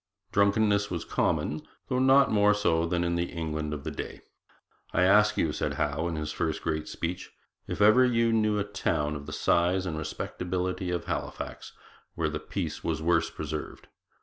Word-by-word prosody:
Drunkenness 100 0 +3
was 85 -2 -4
common, 75 +1 0 0.3
though 125 - 0
not 135 +1 +5
more 105 -1 +4
so 85 -5 +1
than 85 0 0
in 85 0 0
the 85 0 -1
England 80 -2 -3
of 75 -2 -5
that - - -5
day. - - -6 0.7
'I 90 - +3
ask 105 +3 +5
you,' 75 - +1
said - - -2
Howe 75 +3 -1
in 85 - -3
his 75 -1 -3
first 80 0 -2
great 80 -1 -2
speech, 85 +2 -4 0.4
'if - - -4
ever 110 +5 +7
you 115 -2 +3
knew 110 -1 +2
a 100 - +1
town 75 -7 -1
of 70 0 -8
the - - -6
size 90 +4 +2
and 80 -3 -3
respectability 90 +4 -3
of 90 -1 -2
Halifax - - -5 0.4
where 80 -2 0
the 75 0 -3
peace 80 0 -4
was 80 -2 -1
worse 85 +1 +2
preserved? 75 0 -6
85 Hz, 180 wpm, -28 LUFS, 80-105 Hz, 0.7 s, ever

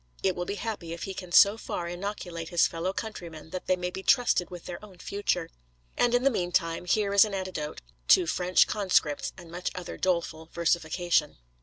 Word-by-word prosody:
It 190 -2 +2
will 175 - -3
be 200 - -3
happy 205 -7 -4
if 170 - -7
he 195 - -4
can 180 -2 -8
so 200 +4 +7
far 170 - -4
inoculate 175 -2 -5
his 175 -2 +4
fellow 170 +3 -2
countrymen 170 -7 -7
that 185 - -6
they 185 - +4
may 180 0 -3
be 190 - -6
trusted 240 -5 +3
with 180 -2 -9
their 175 +3 -7
own 195 -4 -13
future. 200 - -2 0.4
And 245 0 +3
in 245 - +2
the 275 - +4
meantime, 175 -4 0
here 200 +2 +1
is 200 - +8
an 210 -2 -2
antidote 185 -6 -4 0.3
to 180 - +6
'French 180 +2 +3
Conscripts' 185 -8 +1
and 175 -3 -12
much 180 +1 -3
other 180 -1 -6
doleful 170 -3 -1
versification. 170 -1 +1
180 Hz, 195 wpm, -28 LUFS, 170-195 Hz, 0.4 s, is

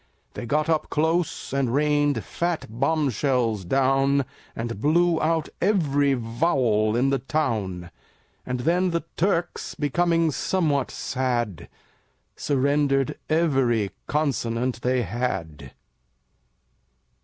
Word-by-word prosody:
They 120 - -6
got 150 +5 +1
up 160 -2 0
close 160 -1 0
And 135 -3 +1
rained 145 -1 +2
fat 170 -1 -2
bombshells 125 -4 0
down, 135 +5 +2 0.3
And 115 -2 -4
blew 170 +3 +3
out 160 0 0
every 145 -8 +2
Vowel 115 -3 +1
in 130 +3 +2
the 135 - +1
town. 110 - -2 0.5
And 125 -1 -3
then 180 +6 +2
the 170 -2 -1
Turks, 175 -1 -1
Becoming 165 +2 +1
somewhat 150 -3 0
sad, 120 - -2 0.7
Surrendered 140 -1 +1
every 135 - +2 0.2
Consonant 125 -5 -1
they 125 0 +1
had. 80 - -4
135 Hz, 100 wpm, -24 LUFS, 120-155 Hz, 0.7 s, blew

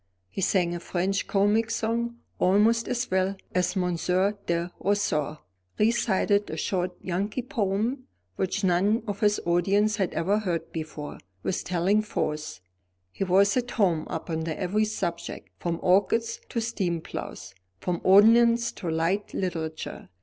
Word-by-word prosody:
He - - -4
sang 180 -2 +2
a 175 - -3
French 190 +3 -1
comic 210 +3 +2
song 235 +1 -1 0.2
almost 215 +5 +3
as 245 -2 -2
well 190 +1 +1 0.2
as 180 +1 +1
Monsieur 180 +2 +1
de 170 +1 0
Roseau, 200 -8 0 0.4
recited 210 -2 +2
a - - -4
short 180 -1 -1
Yankee 200 +7 -2
poem, 230 +3 -1 0.3
which 190 +2 -1
none 195 +5 +2
of 205 -2 -4
his 210 -1 +3
audience 200 +5 +2
had 190 -4 0
ever 200 +5 +2
heard 170 -6 -3
before, 155 -2 -6 0.2
with 190 - -1
telling 185 +4 +2
force. 155 - -3 0.5
He 195 - -3
was 195 +2 +4
at 245 -1 0
home 180 -10 +1
upon 160 -1 -3
every 195 +6 0
subject, 175 -6 -4
from 170 -1 -2
orchids 215 +5 +2
to 235 - -1
steam 190 -7 -1
ploughs, - - -7 0.3
from 175 - -2
ordnance 230 +4 +6
to 175 - -5
light 165 +6 -1
literature. 160 - -4
195 Hz, 140 wpm, -27 LUFS, 175-215 Hz, 0.5 s, ordnance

